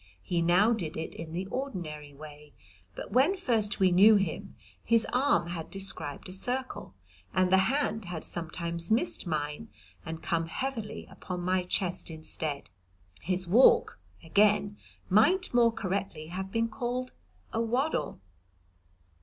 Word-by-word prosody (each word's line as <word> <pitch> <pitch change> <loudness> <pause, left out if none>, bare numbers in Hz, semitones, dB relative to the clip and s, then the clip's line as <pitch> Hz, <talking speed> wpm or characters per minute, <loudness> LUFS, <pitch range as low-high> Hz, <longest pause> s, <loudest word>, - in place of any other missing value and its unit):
He 175 -1 -1
now 180 +7 +4
did 170 -8 -4
it 160 - -5
in 165 -1 -8
the 180 +3 -3
ordinary 170 - -5
way, 150 0 -13 0.4
but - - -7
when 285 - +3
first 220 - +1
we 190 -1 +4
knew 205 +5 +7
him 195 -1 -2 0.3
his 230 0 +3
arm 250 -9 +2
had 165 -2 -5
described 195 -7 -2
a 185 - -8
circle, 250 - -3 0.4
and 185 -1 +3
the 190 - +6
hand 265 -6 -1
had 175 -2 -6
sometimes 170 0 -3
missed 230 - 0
mine 150 +6 -3 0.3
and 160 -1 -7
come 165 -3 0
heavily 235 +3 -4
upon 180 -1 -6
my 185 +1 +1
chest 180 0 -1
instead. 155 -2 -4 0.5
His 185 +1 0
walk, 230 +9 +5 0.2
again, 205 +4 +3 0.3
might 345 - +3
more 235 -1 +5
correctly 190 -6 -4
have 190 +2 -5
been 230 +2 +1
called 250 +2 -3 0.4
a 225 - 0
waddle. 250 +7 -1
190 Hz, 140 wpm, -29 LUFS, 170-230 Hz, 0.5 s, knew